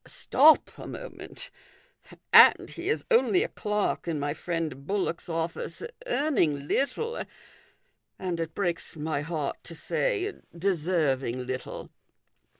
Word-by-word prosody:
Stop 305 +2 +5
a - - -7
moment! - - -8 0.8
And - - +8
he 355 +3 -5
is 455 - 0
only 445 -5 +4
a - - -2
clerk 210 -4 -1
in 160 -3 -1
my 145 0 -1
friend 160 -5 -4
Bullock's 190 -4 -2
office, 165 0 -3 0.2
earning 170 - +1
little, 455 - -1 0.9
and, 180 -3 -3
it 165 -1 -4
breaks 175 -5 -2
rny 155 -1 -2
heart 150 -2 -3
to 165 - -8
say, 410 - -1 0.2
deserving 155 -9 0
little." 130 0 -6
170 Hz, 120 wpm, -28 LUFS, -, 0.9 s, And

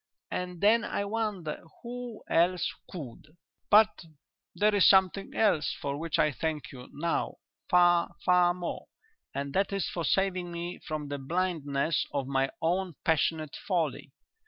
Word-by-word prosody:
and 180 -1 -4
then 225 +3 +5
I 200 - -2
wonder 205 -7 -3 0.2
who 245 -2 -7
else 175 +2 +2 0.2
could. 150 0 -9 0.3
"But 215 -1 +5 0.5
there 210 +1 +3
is 200 -2 +6
something 190 0 +3
else 200 -9 +2
for 140 -1 -3
which 165 -1 -1
I 150 - +3
thank 155 +1 -3
you 125 -1 -11
now 165 +3 -1 0.3
far, 175 -1 +4
far 180 -1 +4
more, 175 -1 -5 0.5
and 140 0 -3
that 195 +3 +1
is 195 -2 -1
for 170 - -3
saving 185 -1 +1
me 170 +1 -5
from 155 -2 -4
the 145 0 -3
blindness 155 -1 -1
of 140 -2 -1
my 135 0 +1
own 180 0 0
passionate 160 -1 +1
folly. 175 -5 -1
175 Hz, 145 wpm, -29 LUFS, 150-190 Hz, 0.5 s, is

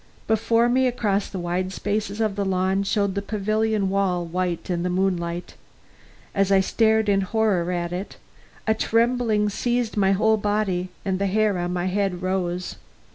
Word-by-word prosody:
Before 230 +2 +2
me, 255 +2 +3
across 210 -5 0
the 195 - -6
wide 180 +1 -2
spaces 205 +1 -2
of 215 -3 0
the 200 - -1
lawn, 190 0 +1
shone 200 0 0
the 200 - -2
pavilion 215 0 0
wall, 190 -3 0
white 175 0 -2
in 175 -2 -1
the 180 - -1
moonlight 180 -2 -1 0.8
As 195 0 +1
I 195 - +6
stared 220 +2 +2
in 200 -1 +3
horror 190 -3 +1
at 175 -1 -2
it, 185 +3 -5 0.5
a 220 - +3
trembling 230 -1 +1
seized 240 +2 -1
my 195 -1 +3
whole 220 +3 +3
body, 205 -3 -1 0.2
and 190 -1 -1
the 200 - +1
hair 205 -1 +1
on 175 0 -2
my 180 0 -1
head 185 -1 -1
rose. 180 -1 -2
195 Hz, 170 wpm, -24 LUFS, 185-215 Hz, 0.8 s, I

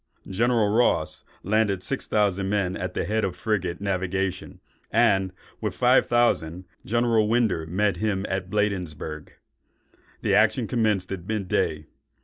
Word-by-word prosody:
General 115 +2 +2
Ross 85 -9 +1 0.2
landed 100 -2 +1
six 135 - -3
thousand 100 -2 +1
men 100 -3 0
at 90 0 -5
the - - -1
head 110 +1 0
of 95 -2 -1
frigate 95 -6 -2
navigation, 95 -1 -2 0.3
and, 95 -5 +3 0.3
with - - -2
five - - +4
thousand, 90 -8 +1 0.2
General 115 -1 +2
Winder 110 -9 +1
met 100 +4 0
him 105 -3 -1
at 95 -1 -3
Bladensburg. 90 -7 -3 0.9
The - - +1
action - - +3
commenced 105 -6 0
at 95 -2 -6
mid 110 -3 -2
day. 75 -3 0
100 Hz, 135 wpm, -25 LUFS, 90-110 Hz, 0.9 s, five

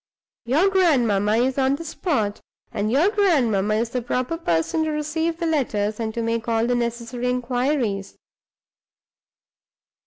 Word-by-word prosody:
Your 295 +11 +3
grandmamma 235 - +3
is 255 +3 +1
on 265 +1 +2
the 330 +3 -8
spot; 275 - -2 0.3
and 215 -1 -1
your 315 - +3
grandmamma 240 - +2
is 230 +1 -1
the 250 - -2
proper 250 +6 -2
person 175 - 0
to - - -1
receive 315 +2 -2
the 340 - -3
letters, 220 -9 -1
and 220 -1 -2
to 230 - -2
make 230 0 -2
all 225 0 +1
the 245 - +1
necessary 240 +1 -2
inquires." 250 -4 -1
245 Hz, 145 wpm, -23 LUFS, 225-300 Hz, 0.3 s, Your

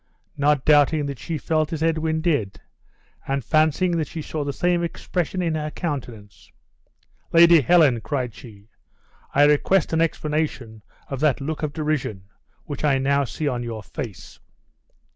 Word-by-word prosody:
Not 145 -1 +1
doubting 150 0 +4
that 140 -2 -5
she 165 -2 -4
felt 155 0 -1
as 160 -1 -2
Edwin 160 -1 0
did, 110 - -1 0.7
and 135 -2 -2
fancying 155 +3 +2
that 155 -3 -1
she 160 -2 -6
saw 155 0 -4
the 140 - -2
same 175 +4 0
expression 180 +1 -3
in 165 -2 0
her 155 -1 -2
countenance. 120 - -6 0.8
"Lady 170 -1 +7
Helen," 145 -6 +4
cried 125 -2 -3
she, 110 -4 -14 0.7
"I 145 - +6
request 150 +5 +3
an 160 - +2
explanation 150 -8 -2 0.3
of 135 - -5
that 150 -2 +2
look 150 +3 -4
of 155 -2 -2
derision 145 - -2 0.4
which 145 -1 -7
I 140 -3 +3
now 140 +1 +1
see 150 +4 -4
on 125 -3 -1
your 115 -3 -6
face. 105 0 -8
150 Hz, 155 wpm, -23 LUFS, 130-160 Hz, 0.8 s, Lady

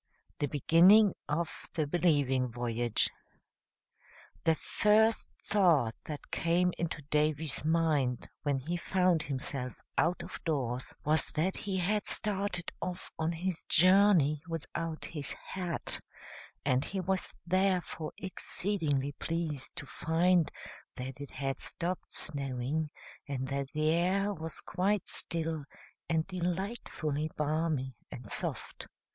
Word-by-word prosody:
THE 145 - +1
BEGINNING 175 - +6 0.2
OF 160 +3 -2
THE 155 -2 +2
BELIEVING 145 -6 +2
VOYAGE. 120 -1 0 1.3
The 160 - +5
first 220 +5 +3
thought 165 - +4
that 150 -2 -7
came 175 +2 +2
into 160 -3 -2
Davy's 150 0 +1
mind 155 -6 +2
when 145 -2 +1
he 160 +7 -2
found 180 -2 +2
himself 135 -2 -3 0.2
out 170 +2 +2
of - - -8
doors 130 -6 -1
was 155 +2 +2
that 170 +5 +1
he 195 -2 -2
had 205 +4 +1
started 200 -4 -1
off 180 0 -4
on 160 +1 +1
his 175 +1 -3
journey 180 -5 +5
without 165 0 -4
his 145 -4 -4
hat, 180 -4 -3 0.6
and 130 -1 +3
he 195 - -3
was 190 0 -1
therefore 185 -3 +1
exceedingly 165 -7 -1
pleased 155 -2 -3
to - - -4
find 165 +4 +2 0.5
that 130 +2 -6
it 140 - -6
had 135 -1 -3
stopped 175 +2 -4
snowing 140 +1 -1 0.4
and 130 -2 -2
that 140 0 -1
the 155 0 +3
air 190 +5 +2
was 160 -3 -4
quite 195 +2 0
still 160 -2 -1 0.5
and 160 -1 +2
delightfully 175 -4 -2
balmy 150 -3 0 0.2
and 120 -4 -8
soft. - - -3
160 Hz, 120 wpm, -32 LUFS, 145-180 Hz, 1.3 s, BEGINNING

